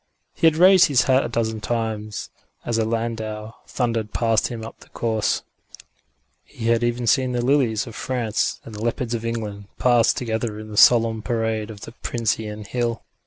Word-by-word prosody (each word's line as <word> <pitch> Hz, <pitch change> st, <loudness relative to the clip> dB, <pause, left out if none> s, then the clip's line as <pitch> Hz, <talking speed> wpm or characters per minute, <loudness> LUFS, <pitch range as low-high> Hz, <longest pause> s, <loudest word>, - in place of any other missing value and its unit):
He 165 Hz, -, +3 dB
had 160 Hz, -, +4 dB
raised 185 Hz, +1 st, +7 dB
his 140 Hz, -5 st, +3 dB
hat 130 Hz, 0 st, +3 dB
a -, -, -3 dB
dozen 110 Hz, -2 st, -2 dB
times 110 Hz, -1 st, -3 dB, 0.3 s
as 115 Hz, -1 st, 0 dB
a 110 Hz, -, +1 dB
landau 110 Hz, -1 st, -3 dB
thundered 115 Hz, -4 st, -2 dB
past 115 Hz, -2 st, +2 dB
him 115 Hz, -2 st, -6 dB
up -, -, -11 dB
the -, -, -18 dB
Course; 110 Hz, -2 st, -1 dB, 1.0 s
he 115 Hz, -, -4 dB
had 115 Hz, 0 st, +3 dB
even 120 Hz, 0 st, 0 dB
seen 130 Hz, +1 st, +2 dB
the 120 Hz, 0 st, -1 dB
lilies 130 Hz, -4 st, +2 dB
of 115 Hz, -, -9 dB
France 120 Hz, -3 st, -1 dB
and 115 Hz, -, -10 dB
the 105 Hz, +1 st, -6 dB
leopards 120 Hz, 0 st, -1 dB
of 115 Hz, -1 st, -3 dB
England 105 Hz, -3 st, -4 dB
pass 120 Hz, -2 st, +4 dB
together 110 Hz, -2 st, -3 dB
in 110 Hz, 0 st, -9 dB
the 105 Hz, -, -7 dB
solemn 115 Hz, 0 st, +5 dB
parade 110 Hz, -2 st, -1 dB
of 105 Hz, -2 st, -10 dB
the -, -, -8 dB
Pincian 110 Hz, -3 st, -3 dB
Hill. 115 Hz, +1 st, -2 dB
115 Hz, 180 wpm, -22 LUFS, 110-120 Hz, 1.0 s, raised